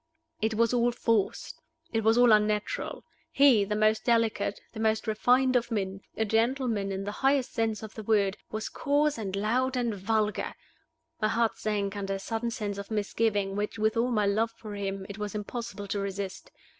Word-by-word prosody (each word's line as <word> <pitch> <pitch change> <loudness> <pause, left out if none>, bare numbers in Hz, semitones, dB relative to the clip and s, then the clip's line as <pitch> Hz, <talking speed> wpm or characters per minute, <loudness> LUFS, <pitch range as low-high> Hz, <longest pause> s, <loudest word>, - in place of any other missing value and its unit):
It 220 0 0
was 230 +1 +2
all 240 0 +3
forced: 230 -3 -1 0.3
it 225 -1 +1
was 225 +2 +4
all 245 -1 +6
unnatural. 210 0 +1 0.3
He, 270 -7 +6
the 210 +1 -2
most 215 +1 +2
delicate, 230 -3 +1
the 220 - -7
most 220 0 +1
refined 250 +4 +3
of 240 -1 +2
men 195 -4 -2 0.2
a 220 - +1
gentleman 225 -2 +1
in 195 0 -3
the 205 - -3
highest 270 -1 +2
sense 225 -2 -1
of 220 - -8
the 220 - -7
word 205 -2 +2
was 215 0 -3
coarse 290 -1 +1
and 195 -3 -3
loud 250 +6 0
and 240 -2 0
vulgar! 210 +2 -1 0.7
My 215 - +3
heart 230 +1 +1
sank 205 -2 -1
under 195 -1 -2
a - - -5
sudden 225 +4 -2
sense 205 -3 -4
of 200 - -7
misgiving 205 -2 0
which, 210 +2 -2
with 220 +1 +1
all 235 +2 +2
my 215 -4 +2
love 215 +3 +2
for 225 -2 -10
him, 195 -1 -4
it 200 +1 -8
was 210 -1 -4
impossible 210 -1 -5
to 205 - -1
resist. 200 - -5
220 Hz, 190 wpm, -28 LUFS, 205-230 Hz, 0.7 s, all